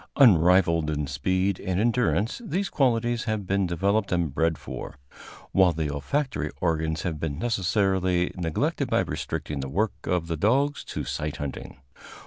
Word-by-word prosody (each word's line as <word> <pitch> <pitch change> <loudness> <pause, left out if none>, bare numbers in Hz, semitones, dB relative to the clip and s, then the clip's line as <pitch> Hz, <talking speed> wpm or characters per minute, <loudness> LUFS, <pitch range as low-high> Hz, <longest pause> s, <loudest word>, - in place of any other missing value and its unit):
Unrivaled 90 - +5
in 75 -1 -1
speed 95 +8 0
and 95 -1 -2
endurance, 115 - +1
these 195 -1 -2
qualities 120 -3 +1
have 110 -3 -2
been 100 0 +1
developed 100 +5 0
and 85 -6 0
bred 80 +1 +1
for, - - -8 0.5
while 95 -2 +4
the 80 -2 -2
olfactory 75 - -2
organs 80 -2 0
have 80 -5 -3
been 75 -3 -3
necessarily 95 -3 +1
neglected 85 -4 -1
by - - +3
restricting 75 -2 -4
the 70 0 -4
work 100 +8 0
of 90 -2 0
the 85 0 -2
dogs 135 - +1
to - - -5
sight 75 0 -3
hunting. 70 -2 -6
90 Hz, 150 wpm, -26 LUFS, 80-110 Hz, 0.5 s, Unrivaled